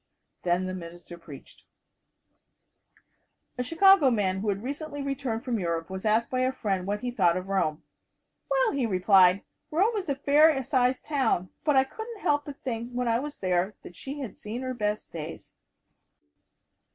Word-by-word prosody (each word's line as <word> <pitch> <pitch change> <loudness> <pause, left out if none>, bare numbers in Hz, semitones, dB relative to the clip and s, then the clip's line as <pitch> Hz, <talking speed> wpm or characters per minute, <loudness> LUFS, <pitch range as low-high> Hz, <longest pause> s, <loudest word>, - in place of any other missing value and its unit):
Then 180 +1 +1
the 185 - -4
minister 175 -1 -9
preached. 155 -5 -13 2.0
A - - +2
Chicago 330 +2 +5
man 195 -5 0
who 210 +2 -2
has 200 - 0
recently 285 +5 -5
returned 270 -5 -3
from 240 -4 -1
Europe 170 -1 -2
was 190 +3 -3
asked 220 +2 +2
by 255 - 0
a 255 0 +2
friend 195 -8 -2
what 205 +1 -2
he 250 0 -2
thought 185 -7 +2
of 185 +1 -6
Rome. 155 -6 0 0.7
"Well," - - +2
he 265 -4 0
replied, 185 -1 +4 0.3
"Rome 395 +9 +2
is 385 -7 -3
a 280 - +1
fair 285 +1 +4
sized 255 0 +1
town, 265 - 0
but 295 -2 +2
I 265 - +6
couldn't 440 - -8
help 290 -4 +1
but 285 -1 -8
think 235 -2 -3
when 250 0 -2
I 230 0 +2
was 290 +2 -6
there 185 +1 0
that 175 - -11
she 280 - -7
had 255 - -6
seen 230 +5 -6
her 255 0 -3
best 210 -3 -3
days." 165 0 -8
235 Hz, 175 wpm, -27 LUFS, 185-280 Hz, 2.0 s, I